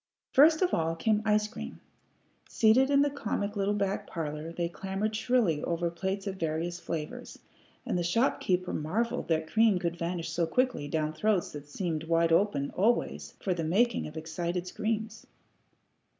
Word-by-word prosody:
First 315 +5 +6
of 365 - +1
all 165 0 +1
came 210 +5 +1
ice 210 0 +3
cream. - - -8 0.7
Seated 245 +4 +4
in 280 0 +5
the 290 - +2
comic 210 -6 -3
little 200 +1 +1
back 200 -1 -1
parlor, 155 0 -4
they 170 0 -2
clamored 195 +4 -3
shrilly 220 -9 +1
over 170 0 -1
plates 190 +3 -3
of 195 -1 -4
various 165 +1 -2
flavors, 155 -3 -5 0.5
and 180 - 0
the - - 0
shopkeeper 180 -2 +1
marvelled 230 +11 -1
that 160 -1 +1
cream 220 +3 +3
could 170 -1 -2
vanish 170 -1 -3
so 170 0 0
quickly 250 - 0
down 155 0 -1
throats 200 +3 +1
that 145 0 -9
seemed 160 -1 -3
wide 165 0 +2
open, 165 -6 +2
always, 220 +6 0
for 190 - +1
the 170 -2 -3
making 210 +9 +2
of 155 +1 -9
excited 170 +2 -3
screams. 220 +3 -3
180 Hz, 165 wpm, -29 LUFS, 165-215 Hz, 0.7 s, First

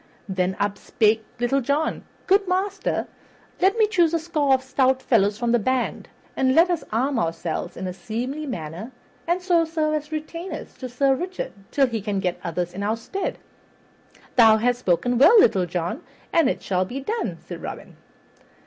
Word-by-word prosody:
Then 190 -1 -1
up 205 0 -1
spake 220 0 +2 0.2
Little 270 +3 +1
John, 285 +5 -1 0.2
"Good 395 +1 +3
master, 385 +2 -1 0.5
let 390 +4 +3
me 440 - +5
choose 345 -6 +2
a - - +1
score 305 -5 +2
of 260 - -4
stout 260 0 +2
fellows 210 -5 +2
from 235 0 0
the 240 - +4
band, 255 +3 -1 0.3
and 260 0 +2
let 345 +2 +5
us 340 - -1
arm 250 +3 +1
ourselves 165 -2 -3
in 185 - -4
a 180 - -3
seemly 245 +11 -4
manner 175 - -6 0.4
and 350 +2 0
so 350 -3 +3
serve 315 -1 -1
as 300 0 -3
retainers 330 +4 -6
to 255 - -5
Sir 270 +3 +2
Richard 370 - -4 0.2
till 275 - +3
he 230 -4 -3
can 200 -1 -2
get 180 -2 -2
others 175 0 -3
in 195 - -5
our 215 +3 0
stead." 385 +12 -4 1.0
"Thou 220 -2 +7
hast 245 +2 +1
spoken 240 +4 +1
well, 430 - +8
Little 190 - +4
John, 175 - -3 0.3
and 325 -6 +4
it - - -3
shall 185 -1 +1
be 250 +9 -5
done," 445 - -3
said - - -9
Robin. - - -8
260 Hz, 180 wpm, -23 LUFS, 205-320 Hz, 1.0 s, well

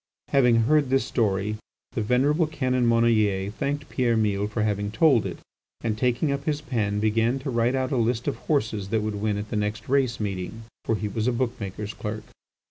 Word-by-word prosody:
Having 125 -4 +4
heard 145 +3 +3
this 135 0 +2
story 105 -2 0 0.3
the 120 - -2
venerable 140 +8 +2
Canon 130 -5 0
Monnoyer 110 -4 +2
thanked 145 +5 -3
Pierre 120 -3 +1
Mille 105 -2 +1
for 105 +1 -2
having 105 -1 -1
told 120 +2 +3
it, - - -6 0.4
and, 110 -2 -1
taking 125 +6 +1
up 140 - -3
his 150 -2 0
pen, 105 -8 -1
began 115 +4 +2
to 135 0 -4
write 120 +2 +1
out 130 +1 -1
a 135 - +1
list 115 0 0
of - - -1
horses 110 -9 -1
that 110 0 0
would 105 -1 -3
win 105 -1 0
at 105 +1 -5
the - - -2
next 105 +1 -2
race 130 -4 +1
meeting. 100 +2 -4 0.2
For 115 - +1
he 105 0 -3
was 110 +2 -2
a - - +3
book 120 0 0
maker's 105 +1 -5
clerk. 105 0 -5
115 Hz, 205 wpm, -25 LUFS, 105-130 Hz, 0.4 s, Having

